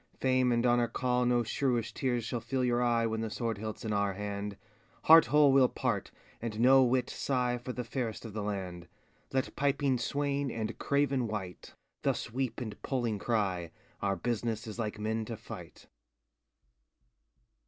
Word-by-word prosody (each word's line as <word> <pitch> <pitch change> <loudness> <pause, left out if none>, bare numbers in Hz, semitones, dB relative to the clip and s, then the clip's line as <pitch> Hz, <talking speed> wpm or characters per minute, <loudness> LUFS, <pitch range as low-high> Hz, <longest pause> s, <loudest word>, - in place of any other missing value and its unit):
Fame 130 -1 +3
and 120 0 +2
Honor 120 -1 +3
call 125 +1 0
No 120 -1 +3
shrewish 120 0 0
teares 120 -4 -1
shall 120 +2 -2
fill 130 +3 -2
your 120 -1 +2
eye 120 -1 +2
When 110 0 -1
the 110 - -2
sword 115 0 -2
hiltŌĆÖs 110 +2 -6
in 110 - -1
our 100 -1 +1
hand, 100 +1 -4
ŌĆö 105 +2 -28
Heart 160 0 +9
whole 145 +1 +5
weŌĆÖll 130 -2 +4
part, - - -1 0.3
and 110 -2 -4
no 130 +3 +7
whit 125 0 +2
sighe 125 -2 -1
For 125 - -4
the 125 0 -4
fayrest 115 -2 -4
of 110 - -7
the 105 - -3
land; 95 -4 -4 0.4
Let 130 0 -1
piping 140 -2 +1
swaine, 140 +2 -1
and 115 -1 -3
craven 140 -3 +1
wight, 95 -5 -6 0.3
Thus - - -1
weepe 130 +1 -2
and 110 -4 -6
poling 120 -6 -1
crye, 95 -8 0 0.3
Our 100 -1 +1
business 115 +2 -2
is 110 +1 -7
like 105 -2 -2
men 110 +1 -1
to 115 0 -6
fight. - - -10
120 Hz, 175 wpm, -31 LUFS, 110-130 Hz, 0.4 s, Heart